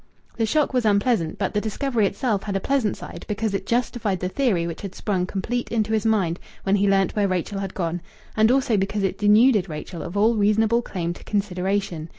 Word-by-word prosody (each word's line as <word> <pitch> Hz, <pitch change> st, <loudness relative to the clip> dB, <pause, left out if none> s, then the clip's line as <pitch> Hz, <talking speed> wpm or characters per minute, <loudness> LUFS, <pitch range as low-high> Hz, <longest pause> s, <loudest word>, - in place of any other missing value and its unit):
The 225 Hz, -1 st, +1 dB
shock 300 Hz, +2 st, +1 dB
was 250 Hz, -2 st, +2 dB
unpleasant, 205 Hz, -5 st, +1 dB
but 195 Hz, -, -2 dB
the 210 Hz, -, +1 dB
discovery 220 Hz, 0 st, 0 dB
itself 205 Hz, 0 st, -1 dB
had 200 Hz, -1 st, -4 dB
a -, -, +2 dB
pleasant 250 Hz, -2 st, 0 dB
side, 170 Hz, -, -9 dB
because 210 Hz, 0 st, -2 dB
it 195 Hz, 0 st, -3 dB
justified 235 Hz, -5 st, 0 dB
the 180 Hz, -, -2 dB
theory 200 Hz, -8 st, +1 dB
which 170 Hz, -1 st, -5 dB
had 195 Hz, -2 st, -7 dB
sprung 185 Hz, -4 st, -1 dB
complete 240 Hz, +6 st, -3 dB
into 220 Hz, -1 st, 0 dB
his 220 Hz, 0 st, +1 dB
mind 190 Hz, -6 st, +1 dB, 0.2 s
when 195 Hz, +1 st, +2 dB
he 200 Hz, 0 st, +2 dB
learnt 195 Hz, -1 st, +2 dB
where 205 Hz, -2 st, +2 dB
Rachel 185 Hz, +2 st, -2 dB
had 195 Hz, -1 st, -5 dB
gone, 175 Hz, -1 st, -2 dB, 0.3 s
and 220 Hz, 0 st, +4 dB
also 255 Hz, -4 st, +2 dB
because 195 Hz, +1 st, -1 dB
it 195 Hz, -, -1 dB
denuded 210 Hz, -1 st, +4 dB
Rachel 155 Hz, +2 st, -6 dB
of 175 Hz, +6 st, -5 dB
all 220 Hz, +3 st, +4 dB
reasonable 215 Hz, +3 st, +3 dB
claim 175 Hz, -6 st, -3 dB
to -, -, -14 dB
consideration. 190 Hz, -4 st, -2 dB
205 Hz, 210 wpm, -23 LUFS, 190-220 Hz, 0.3 s, and